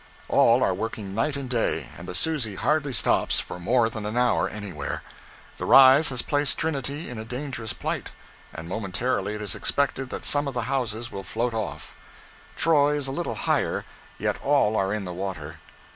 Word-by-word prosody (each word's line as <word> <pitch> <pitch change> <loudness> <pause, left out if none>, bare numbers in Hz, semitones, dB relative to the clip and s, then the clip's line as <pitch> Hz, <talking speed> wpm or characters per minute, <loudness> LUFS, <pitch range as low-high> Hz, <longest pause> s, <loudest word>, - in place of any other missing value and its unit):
All 120 +2 +5
are 95 - +2
working 105 0 -4
night 115 +8 0
and 140 -2 -4
day, 110 - -1
and - - -10
the 90 - -5
'Susie' 130 - 0
hardly 150 +5 +1
stops 120 - +2
for - - -6
more 115 +6 +3
than 110 -2 -5
an 110 +3 -3
hour 125 -1 +2
anywhere. 95 -9 -5 0.5
The - - -4
rise 135 +3 +8
has 125 -3 -1
placed 145 -1 +1
Trinity 145 0 -2
in 125 -3 -6
a - - -5
dangerous 125 -1 -4
plight, - - -3 0.4
and 80 +1 -8
momentarily 105 +2 -1
it 105 - -5
is 100 -3 -1
expected 135 -2 -1
that - - -6
some 145 0 +1
of 135 - -4
the 120 - -1
houses 120 -3 -2
will 100 - -5
float 115 +6 -2
off. 110 -2 -4 0.6
Troy 150 -2 +4
is 145 -2 -1
a 135 - -2
little 170 +5 -3
higher, - - +1 0.3
yet - - -2
all 140 -7 +3
are 95 -2 +1
in 105 -2 -2
the 90 - -5
water. 85 -4 -5
120 Hz, 190 wpm, -25 LUFS, 105-135 Hz, 0.6 s, rise